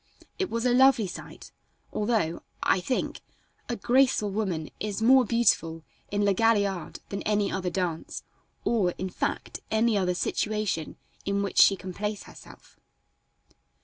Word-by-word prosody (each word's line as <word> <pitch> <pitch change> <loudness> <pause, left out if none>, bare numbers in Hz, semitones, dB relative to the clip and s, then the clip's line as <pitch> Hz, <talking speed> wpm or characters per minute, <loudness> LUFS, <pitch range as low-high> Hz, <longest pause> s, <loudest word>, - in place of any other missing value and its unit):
It 380 - 0
was 230 +1 -2
a 245 - +3
lovely 265 -3 +5
sight, 180 - -9 0.4
although, 210 -7 0 0.2
I - - +3
think, 220 +8 -2 0.5
a 240 - -1
graceful 245 -2 +2
woman 190 -7 -2
is 210 -1 -3
more 255 +3 +6
beautiful 165 -8 +2 0.3
in 205 0 0
La 200 - +4
Galliard 200 -4 +1
than 200 - -4
any 205 -2 0
other 185 -1 -2
dance, 175 -2 -3 0.4
or, 195 -7 +2
in 185 - -3
fact, - - -3
any 220 0 +2
other 180 -1 0
situation 210 -4 -1 0.3
in 200 0 0
which 200 - 0
she 195 - +7
can 185 -1 -8
place 210 +2 -3
herself. - - -15
205 Hz, 145 wpm, -27 LUFS, 185-230 Hz, 0.5 s, she